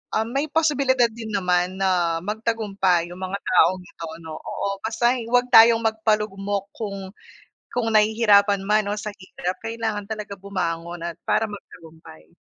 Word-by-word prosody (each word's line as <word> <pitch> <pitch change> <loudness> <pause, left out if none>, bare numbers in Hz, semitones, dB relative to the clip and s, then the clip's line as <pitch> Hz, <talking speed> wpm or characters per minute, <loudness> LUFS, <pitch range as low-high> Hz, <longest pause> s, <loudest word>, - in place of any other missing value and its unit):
um, 220 +1 +1
may 275 +3 -1
posibilidad 275 -6 +2
din 225 0 -8
naman 180 -1 +1
na 175 -3 +1
magtagumpay 200 -5 0
yung 180 - -10
mga 185 +1 -3
taong 185 +1 +3
ito, 165 -2 -9 0.2
'no, 160 -1 -7
oo. - - -4 0.2
Basta'y 235 +2 0
huwag 245 0 +3
tayong 230 -1 +7
magpalugmok 210 -3 -1
kung 195 -3 -6 0.6
kung 240 -2 -1
nahihirapan 210 -2 +4
man 215 0 +2
o 210 - -1
sa 210 - -5
hirap, 185 -1 -5
kailangan 225 -2 -3
talaga 210 -2 -6
bumangon 175 -3 -4
at 170 - -6
para 225 - +2
magtagumpay. 160 - -13
205 Hz, 145 wpm, -23 LUFS, 185-225 Hz, 0.6 s, tayong